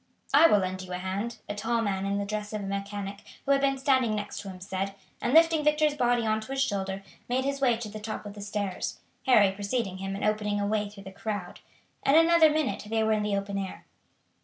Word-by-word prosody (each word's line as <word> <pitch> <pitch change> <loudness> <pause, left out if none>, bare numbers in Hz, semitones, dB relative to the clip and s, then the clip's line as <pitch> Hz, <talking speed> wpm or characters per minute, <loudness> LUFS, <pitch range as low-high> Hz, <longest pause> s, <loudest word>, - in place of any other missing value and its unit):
"I 305 +4 +8
will 210 - +5
lend 185 -1 -2
you 185 -1 -9
a - - -1
hand," 195 +6 -3
a - - -3
tall 225 +2 0
man 195 -2 -1
in 200 0 0
the 200 - -1
dress 210 +1 -4
of 210 - -2
a - - -5
mechanic, 200 0 -4 0.3
who 280 - +1
had 275 0 +4
been 275 -1 +2
standing 260 -5 +2
next 205 -1 -4
to 200 - -7
him, 185 -1 -9
said, 195 +1 -3 0.3
and, 240 - 0
lifting 325 0 +5
Victor's 300 0 +3
body 245 -4 +2
on 220 0 +1
to 260 +5 -6
his 270 - 0
shoulder, 195 -4 -2 0.3
made 260 +2 +1
his 275 0 -2
way 245 -4 +4
to 230 -1 -5
the 215 +1 -7
top 215 0 -5
of 205 - -7
the 205 - -9
stairs, 205 -2 -3 0.3
Harry 210 -6 +6
preceding 200 0 -2
him 195 0 -3
and 200 - -2
opening 210 -1 0
a 205 - 0
way 210 0 0
through 200 -1 -12
the 190 - -9
crowd. 205 -3 -5 0.4
In 275 - +4
another 330 0 +7
minute 305 -2 0
they 220 0 +1
were 220 0 +3
in 215 - +1
the 210 -1 0
open 200 0 -3
air. 190 -1 -6
210 Hz, 245 wpm, -28 LUFS, 200-250 Hz, 0.4 s, I